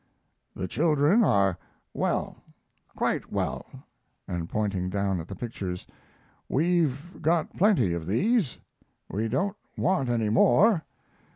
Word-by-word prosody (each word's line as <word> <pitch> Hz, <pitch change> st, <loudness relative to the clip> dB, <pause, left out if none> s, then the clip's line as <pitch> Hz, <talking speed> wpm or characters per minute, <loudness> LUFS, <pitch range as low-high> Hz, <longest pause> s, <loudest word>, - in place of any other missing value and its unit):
"The 95 Hz, -, -3 dB
children 155 Hz, -, +3 dB
are 95 Hz, -, +3 dB, 0.3 s
well, -, -, -1 dB, 0.6 s
quite -, -, -1 dB
well," -, -, -2 dB, 0.6 s
and 85 Hz, -2 st, -4 dB
(pointing 100 Hz, -4 st, -1 dB
down 100 Hz, -1 st, 0 dB
at 80 Hz, -, -7 dB
the 100 Hz, -, -7 dB
pictures) 95 Hz, -5 st, -5 dB, 0.6 s
"We've 165 Hz, -1 st, 0 dB
got 165 Hz, +1 st, +1 dB
plenty 170 Hz, -, +3 dB
like 85 Hz, -1 st, -5 dB
these. 185 Hz, -, +1 dB, 0.5 s
We 110 Hz, +4 st, -1 dB
don't 190 Hz, -, 0 dB, 0.2 s
want 180 Hz, -9 st, +1 dB
any 115 Hz, -3 st, +1 dB
more. 165 Hz, -, +4 dB
120 Hz, 115 wpm, -27 LUFS, -, 0.6 s, more